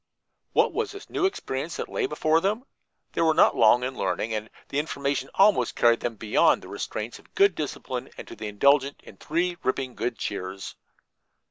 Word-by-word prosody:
What - - +3
was 445 -2 -2
this 400 - -11
new 380 - +2
experience 150 - -4
that - - -4
lay 420 -5 -1
before 160 - +2
them? 210 +7 -1 0.5
They - - 0
were 160 -1 +3
not - - +5
long 120 +2 +5
in 130 +1 -3
learning, 110 -2 -1
and 110 0 -3 0.2
the 140 - 0
information 140 -3 -2
almost 205 +1 +4
carried 115 -1 +4
them 120 -1 -3
beyond 105 0 +3
the - - -11
restraints 110 +3 -5
of - - -24
good 200 -1 +5
discipline 130 -4 -5
and - - -8
to - - -9
the 110 - -6
indulgence 140 +6 +3
in - - -14
three 175 +3 -1
ripping 130 -1 -1
good 120 -1 -3
cheers. 95 -1 -5
140 Hz, 190 wpm, -26 LUFS, 115-170 Hz, 0.5 s, not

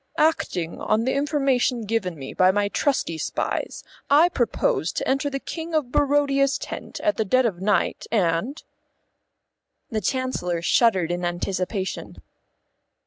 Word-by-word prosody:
Acting 185 - 0
on 215 +2 +1
the 260 - 0
information 275 -5 +1
given 200 -5 -1
me 135 -1 -7
by 185 0 +4
my 205 +1 +1
trusty 205 - 0
spies, - - -3 0.3
I 310 +5 +6
propose 345 - 0
to - - -3
enter 275 +2 +1
the 275 -1 -3
King 325 +3 -5
of 280 -6 0
Barodia's 280 -1 +2
tent - - -7
at 315 - +1
the 220 - +2
dead 255 +5 +2
of 185 -6 -2
night, 200 -2 0
and 210 - 0 0.6
" - - -51
The 220 -1 -1
Chancellor 180 -8 -1
shuddered 190 -6 +3
in 175 0 -2
anticipation. 185 +2 -3
230 Hz, 140 wpm, -24 LUFS, 185-275 Hz, 0.6 s, I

